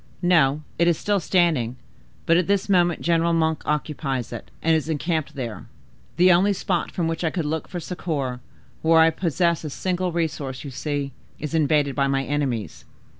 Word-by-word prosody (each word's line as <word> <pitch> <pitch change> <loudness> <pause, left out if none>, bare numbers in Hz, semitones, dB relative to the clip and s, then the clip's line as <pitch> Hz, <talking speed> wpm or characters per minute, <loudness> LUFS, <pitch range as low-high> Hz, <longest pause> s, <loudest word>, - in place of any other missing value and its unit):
"No, 155 -5 +3 0.2
it 170 - +4
is 170 -3 +3
still 205 +2 0
standing: 165 -10 +1 0.5
but 165 - +4
at 175 0 +2
this 200 -1 +1
moment 175 -3 +2
General 170 0 +2
Monk 160 -1 +1
occupies 145 -5 -2
it 120 - -8
and 165 0 +4
is 160 0 -1
encamped 155 -1 -1
there. 120 -5 -6 0.5
The 180 +2 +6
only 190 +4 +4
spot 185 -2 -1
from 170 -2 -2
which 165 +1 -3
I 165 - +2
could 170 -1 -3
look 155 +1 -2
for 180 - -5
succor, 150 -7 -3 0.4
where 165 0 +4
I 160 0 +6
possess 170 0 0
a 155 - -4
single 180 +4 -2
resource, 150 -6 -3
you 140 - -7
see, 145 +1 -3 0.3
is 150 +1 -5
invaded 150 -3 +2
by 140 0 +1
my 135 0 +1
enemies." 130 - -2
160 Hz, 180 wpm, -23 LUFS, 140-175 Hz, 0.5 s, The